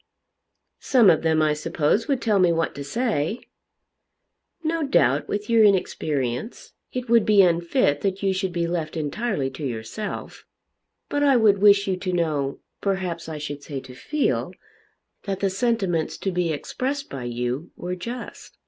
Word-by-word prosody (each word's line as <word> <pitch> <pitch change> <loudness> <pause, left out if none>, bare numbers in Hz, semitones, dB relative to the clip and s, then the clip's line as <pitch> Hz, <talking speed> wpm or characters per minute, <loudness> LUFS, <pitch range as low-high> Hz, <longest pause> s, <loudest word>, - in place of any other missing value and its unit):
"Some 235 -8 +5
of 160 - +2
them 160 -1 +2
I 155 -1 +3
suppose 160 +6 0
would 275 -4 0
tell 210 -3 +3
me 180 -2 +4
what 165 -1 0
to 140 - -6
say." 220 - -1 1.2
"No 325 +1 0
doubt 145 - +2
with 205 0 -3
your 230 -1 +5
inexperience 155 - 0 0.2
it 250 0 -4
would 230 -1 +5
be 205 -2 +6
unfit 170 - +2
that 195 0 -2
you 195 -1 +2
should 190 0 -2
be 170 -1 -1
left 170 -2 -3
entirely 155 - -2
to 135 +3 -8
yourself. 125 - -5 0.6
But 290 - -1
I 280 -2 +5
would 210 -4 +4
wish 200 0 +5
you 190 -1 0
to 185 0 -3
know, 150 -5 -1 0.2
perhaps 185 -4 -2
I 155 - -5
should 145 -1 -6
say 140 -1 -5
to 130 - -12
feel, 295 - -1 0.7
that 195 -2 -2
the 195 -1 +1
sentiments 195 -6 0
to 195 - -2
be 175 -2 0
expressed 270 - -3
by 130 -3 -6
you 125 +6 -3
were 180 +1 -4
just." 235 +7 -8
180 Hz, 165 wpm, -24 LUFS, 150-215 Hz, 1.2 s, be